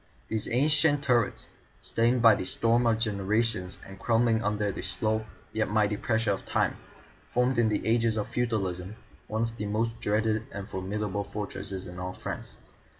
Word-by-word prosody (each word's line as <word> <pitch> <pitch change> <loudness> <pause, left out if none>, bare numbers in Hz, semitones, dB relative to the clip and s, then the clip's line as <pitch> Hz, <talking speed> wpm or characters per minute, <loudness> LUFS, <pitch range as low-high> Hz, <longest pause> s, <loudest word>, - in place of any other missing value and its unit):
These 110 -1 -1
ancient 145 +3 +3
turrets, 120 -5 +1 0.3
stained 120 +1 +2
by 115 -2 +9
the 100 - -1
storms 115 +5 +2
of 115 -1 +3
generations 105 -3 0
and 95 0 -11
crumbling 115 -1 +2
under 105 -1 0
the - - -6
slow 110 +4 0 0.3
yet 110 0 0
mighty 105 -1 +2
pressure 110 +1 +1
of 95 - -2
time, - - 0 0.5
formed 125 0 +1
in 115 -2 +4
the 105 - -1
ages 115 -1 +2
of 105 - -1
feudalism 100 -5 -2 0.3
one 110 +1 -1
of 115 0 -3
the 105 - -3
most 115 +2 -1
dreaded 110 +1 0
and 100 -1 -6
formidable 100 +1 -2
fortresses 100 -2 -5
in 90 0 -8
all 90 0 -4
France. - - -6
110 Hz, 165 wpm, -28 LUFS, 100-115 Hz, 0.5 s, by